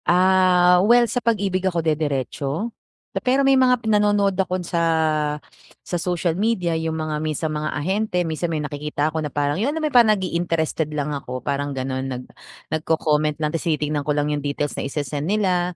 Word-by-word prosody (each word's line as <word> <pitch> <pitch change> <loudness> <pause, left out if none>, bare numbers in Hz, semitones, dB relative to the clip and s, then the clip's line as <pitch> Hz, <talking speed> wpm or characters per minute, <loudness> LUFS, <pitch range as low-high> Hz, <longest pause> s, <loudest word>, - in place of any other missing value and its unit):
Ah, 180 0 +5
well, 235 +4 +5
sa 245 +2 -2
Pag-Ibig 195 -5 0
ako 170 -2 -2
dederetso. 150 - -2 0.5
Pero 265 +2 +3
may 270 -1 +5
mga 255 -1 +5
pinanonood 205 -3 +2
ako 185 -1 0
sa 170 -1 -1 1.0
sa 175 - -3
social 175 0 0
media, 180 -7 0
yung 160 0 -2
mga 155 -1 -2
minsan 155 0 -2
mga 150 -1 -3
ahente, 180 +4 0
minsan 165 +1 -2
may 160 -2 -2
nakikita 150 +1 -2
ako 160 - -2
na 155 - -2
parang, 145 +2 -1
yung 225 - +1
alam 320 - -3
mo 305 - 0
parang 235 -4 +6
nag-i-interested 170 -4 -1
lang 150 0 -2
ako, 130 -3 -5
parang 140 +1 -2
gano'n, 130 0 -3
nag 125 -1 -5 0.5
nagko-comment 155 -1 +1
lang 150 - 0
ta's 165 +1 -3
tinitingnan 150 -2 -1
ko 150 - +1
lang 150 0 0
yung 150 - -1
details 145 0 -2
na - - -2
isesend 145 +1 -3
nila. 180 -3 +1
165 Hz, 180 wpm, -22 LUFS, 150-190 Hz, 1.0 s, parang